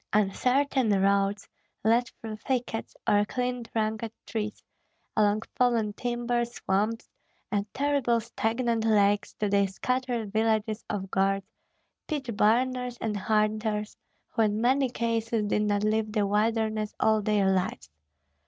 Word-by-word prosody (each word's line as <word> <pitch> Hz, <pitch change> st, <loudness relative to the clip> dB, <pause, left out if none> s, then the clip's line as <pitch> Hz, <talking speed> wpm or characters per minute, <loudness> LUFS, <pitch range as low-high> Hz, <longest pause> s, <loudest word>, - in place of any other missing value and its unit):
Uncertain 250 Hz, +5 st, +2 dB
roads 200 Hz, +1 st, +1 dB, 0.4 s
led 230 Hz, +3 st, +3 dB
through 220 Hz, -1 st, -6 dB
thickets 240 Hz, -1 st, -3 dB
or 205 Hz, 0 st, +4 dB
clean 245 Hz, +2 st, -2 dB
trunked 220 Hz, 0 st, -2 dB, 0.2 s
trees, 215 Hz, -2 st, -4 dB, 0.5 s
along 210 Hz, 0 st, +3 dB
fallen 230 Hz, -4 st, +2 dB
timber, 240 Hz, +1 st, -1 dB
swamps, 225 Hz, -1 st, -1 dB, 0.4 s
and 205 Hz, -1 st, -1 dB
terrible 275 Hz, -4 st, +1 dB
stagnant 230 Hz, 0 st, -1 dB
lakes 205 Hz, -2 st, +3 dB
to 210 Hz, -, -1 dB
the 200 Hz, 0 st, +3 dB
scattered 240 Hz, +1 st, -2 dB
villages 220 Hz, 0 st, +1 dB
of 195 Hz, -2 st, -3 dB
guards, 195 Hz, 0 st, +1 dB, 0.6 s
pitch 270 Hz, -7 st, -3 dB
burners, 250 Hz, +3 st, +2 dB
and 215 Hz, -2 st, -2 dB
hunters, 215 Hz, +1 st, 0 dB, 0.3 s
who -, -, -1 dB
in 210 Hz, -1 st, +2 dB
many 260 Hz, +3 st, +3 dB
cases 230 Hz, -2 st, -1 dB
did 210 Hz, +1 st, +1 dB
not 205 Hz, -1 st, +1 dB
leave 215 Hz, 0 st, +1 dB
the 210 Hz, -2 st, +1 dB
wilderness 215 Hz, +1 st, 0 dB
all 220 Hz, -1 st, +3 dB
their 205 Hz, -2 st, +2 dB
lives. 185 Hz, -, -2 dB
220 Hz, 125 wpm, -28 LUFS, 205-240 Hz, 0.6 s, or